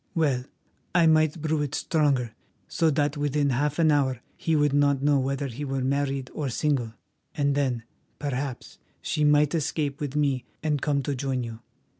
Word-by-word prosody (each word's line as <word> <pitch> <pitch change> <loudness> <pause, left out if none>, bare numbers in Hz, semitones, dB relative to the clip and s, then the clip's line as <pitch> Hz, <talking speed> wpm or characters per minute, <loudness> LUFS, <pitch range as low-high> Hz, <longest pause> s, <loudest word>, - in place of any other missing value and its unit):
Well, 140 -6 +1 0.5
I 170 -2 +5
might 155 0 +3
brew 155 -1 0
it 145 -1 -2
stronger 140 -8 +1 0.3
so 165 -1 +2
that 145 0 0
within 145 -1 +1
half 145 +3 0
an 160 -2 +4
hour 135 -4 +1 0.2
he 165 - 0
would 145 -2 +2
not 140 -1 +3
know 145 -1 +4
whether 135 +1 -1
he 135 +2 -5
were 135 -1 -2
married 135 -1 -1
or 145 -3 -2
single, 125 -4 -1 0.4
and 145 -3 +1
then, 130 -5 0 0.3
perhaps, 140 -2 -4 0.2
she 150 - 0
might 150 0 +4
escape 150 -3 -1
with 145 -1 -3
me 140 -4 +1 0.2
and 150 -3 0
come 140 -2 +1
to 140 - -1
join 130 -1 -2
you. 115 -1 -7
145 Hz, 175 wpm, -26 LUFS, 135-150 Hz, 0.5 s, I